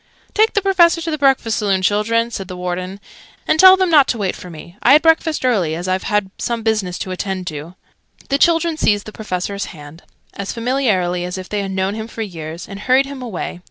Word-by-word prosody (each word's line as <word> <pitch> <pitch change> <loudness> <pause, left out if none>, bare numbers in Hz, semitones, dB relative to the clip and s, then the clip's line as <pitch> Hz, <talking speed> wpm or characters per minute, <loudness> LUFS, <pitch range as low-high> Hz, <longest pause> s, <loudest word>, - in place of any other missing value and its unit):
"Take 435 +1 +3
the 410 - +1
Professor 350 -4 +4
to 325 - -3
the 305 - -1
breakfast 265 -5 +2
saloon, 195 -3 0
children," 230 +4 +1
said 195 -4 -5
the 180 -1 -8
Warden. 180 +2 -4 0.5
"And 310 - +2
tell 375 +1 +9
them 375 -2 +1
not 290 -4 +6
to 235 - -1
wait 195 -4 -2
for 180 - -10
me. 170 +2 -11
I 265 - +6
had 300 - +6
breakfast 325 -3 +2
early, 190 -11 +1
as 175 +2 -5
I've 185 0 -1 0.4
some 235 -1 -2
business 215 -5 -1
to 185 - -5
attend 185 0 -4
to." 155 +4 -8 0.5
The 275 - +1
children 330 0 +2
seized 205 -7 +1
the 215 - -8
Professor's 200 -1 -4
hands, 150 +3 -12 0.3
as 200 -1 -5
familiarly 220 -8 0
as 180 +1 -4
if 185 -1 -8
they 210 -1 -1
had 195 - -4
known 190 +1 -1
him 220 +1 -5
for 230 -1 -5
years, 165 -3 -7
and 200 0 -8
hurried 255 +5 +3
him 275 -1 -8
away. 205 -7 -5
210 Hz, 220 wpm, -18 LUFS, 185-270 Hz, 0.5 s, tell